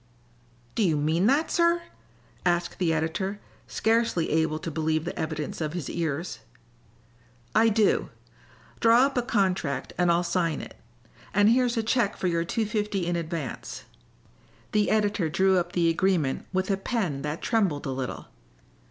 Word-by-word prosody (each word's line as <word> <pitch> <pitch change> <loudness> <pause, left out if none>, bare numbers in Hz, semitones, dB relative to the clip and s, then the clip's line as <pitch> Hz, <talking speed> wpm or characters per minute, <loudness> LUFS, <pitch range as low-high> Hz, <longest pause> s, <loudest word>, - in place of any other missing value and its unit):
"Do - - -1
you 165 -7 +3
mean 160 +6 +2
that, 285 +6 +2
sir?" 340 0 +3 0.6
asked 175 0 0
the 175 -3 +2
editor, 165 +6 -1 0.3
scarcely 225 -7 +1
able 160 0 +1
to 165 +1 -5
believe 155 +1 0
the 175 - -4
evidence 155 0 -3
of 155 0 -2
his 175 -6 -4
ears. 165 0 -3 1.1
"I 225 +1 +5
do. 215 -1 +2 0.7
Draw 235 +3 +6
up 275 - -2
a 245 - +2
contract 190 - -1
and 175 -1 +4
I'll 170 +1 +2
sign 170 -3 0
it. - - -9 0.6
And 205 +1 +5
here's 245 0 +2
a 225 - +1
check 225 -2 +1
for - - -4
your 170 -2 +1
two 220 +6 -1
fifty 210 -3 -1
in 175 0 0
advance." 165 -6 -5 0.9
The 210 -1 +2
editor 205 -5 +1
drew 190 +3 +3
up 175 0 -4
the 170 -1 +2
agreement 165 -5 0
with 190 +1 0
a 195 - +1
pen 195 - -2
that 150 +2 -4
trembled 195 -12 +1
a 135 - -2
little. 130 -1 -4
180 Hz, 160 wpm, -26 LUFS, 160-215 Hz, 1.1 s, Draw